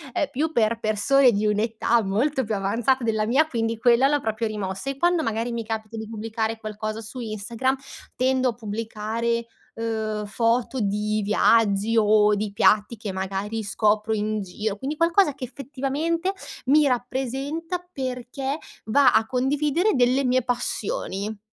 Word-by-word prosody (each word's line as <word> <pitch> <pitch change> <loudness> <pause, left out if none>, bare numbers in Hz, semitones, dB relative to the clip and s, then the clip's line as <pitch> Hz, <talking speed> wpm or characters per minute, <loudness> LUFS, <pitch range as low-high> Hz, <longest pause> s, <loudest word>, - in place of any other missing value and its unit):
uhm, 295 - 0
più 305 +5 -1
per 230 -2 +2
persone 240 +5 +4
di 210 0 0
un'età 225 +2 +1
molto 260 +8 0
più 215 0 -1
avanzata 230 +6 +1
della 220 -2 +1
mia, 270 +7 +4
quindi 230 -5 -1
quella 240 +3 +4
l'ho 290 0 +1
proprio 220 0 -1
rimossa, 205 +3 -4
e 275 - -4
quando 345 +2 +2
magari 225 0 -1
mi 230 -1 -3
capita 220 0 -5
di 220 0 -5
pubblicare 225 0 -3
qualcosa 215 0 -5
su 225 +4 -8
Instagram 230 +3 -2 0.4
tendo 260 0 +2
a - - -2
pubblicare, 225 +1 -3 0.3
uhm, 220 -2 -2
foto 230 +5 0
di 210 0 0
viaggi, 210 +1 +3
o 210 -1 +5
di 205 0 -3
piatti 210 +1 +3
che 210 -1 -5
magari 195 +3 -3
scopro 210 +1 +1
in 215 0 -1
giro, 205 +2 -4
quindi 275 +8 -4
qualcosa 335 0 +3
che 270 0 -10
effettivamente 280 +7 -2 0.4
mi 295 +2 +5
rappresenta 270 +7 -2
perché 265 0 -4 0.3
va 255 +3 +5
a 220 0 +4
condividere 290 - +1
delle 255 +2 +3
mie 255 0 +2
passioni. 215 -4 -3
230 Hz, 150 wpm, -24 LUFS, 215-265 Hz, 0.4 s, o